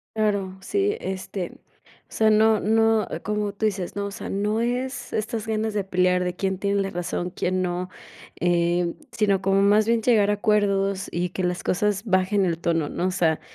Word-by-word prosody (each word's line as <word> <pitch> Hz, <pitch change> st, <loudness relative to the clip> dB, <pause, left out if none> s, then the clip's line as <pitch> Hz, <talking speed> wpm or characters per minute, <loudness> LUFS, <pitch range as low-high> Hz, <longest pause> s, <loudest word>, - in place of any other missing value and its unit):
Claro, 200 Hz, -3 st, 0 dB
sí. 400 Hz, -, 0 dB
Este, 190 Hz, -1 st, -4 dB
o -, -, -36 dB, 0.2 s
sea, 220 Hz, 0 st, +2 dB
no 215 Hz, 0 st, +4 dB
no 225 Hz, +1 st, +3 dB
ah, -, -, -3 dB
como 210 Hz, -1 st, -2 dB
tú 210 Hz, +2 st, -2 dB
dices, 195 Hz, -3 st, -2 dB
¿no? 200 Hz, -, -1 dB
O 200 Hz, -, -5 dB
sea, -, -, -7 dB
no 210 Hz, +3 st, 0 dB
es 245 Hz, +1 st, -2 dB
estas 215 Hz, 0 st, -2 dB
ganas 220 Hz, -1 st, -1 dB
de 205 Hz, -, 0 dB
pelear, 180 Hz, -1 st, +2 dB
de 180 Hz, -, -2 dB
quién 190 Hz, -1 st, -1 dB
tiene 200 Hz, +1 st, 0 dB
la 195 Hz, -, -2 dB
razón, 175 Hz, 0 st, -3 dB
quién 185 Hz, 0 st, -1 dB
no, 180 Hz, 0 st, -2 dB, 0.5 s
em, 175 Hz, 0 st, +1 dB, 0.2 s
sino 205 Hz, -4 st, +1 dB
como 195 Hz, +1 st, +2 dB
más 210 Hz, +2 st, +4 dB
bien 230 Hz, 0 st, +2 dB
llegar 215 Hz, -3 st, +3 dB
a 205 Hz, -, +2 dB
acuerdos 200 Hz, -2 st, +1 dB
y 175 Hz, +1 st, -1 dB
que 185 Hz, -, -3 dB
las 180 Hz, 0 st, -1 dB
cosas 205 Hz, +3 st, 0 dB
bajen 190 Hz, 0 st, +2 dB
el 170 Hz, -2 st, 0 dB
tono, 165 Hz, -3 st, 0 dB
¿no? 180 Hz, -, -2 dB
O 185 Hz, -, 0 dB
sea, 165 Hz, -3 st, +1 dB
200 Hz, 200 wpm, -24 LUFS, 180-215 Hz, 0.5 s, no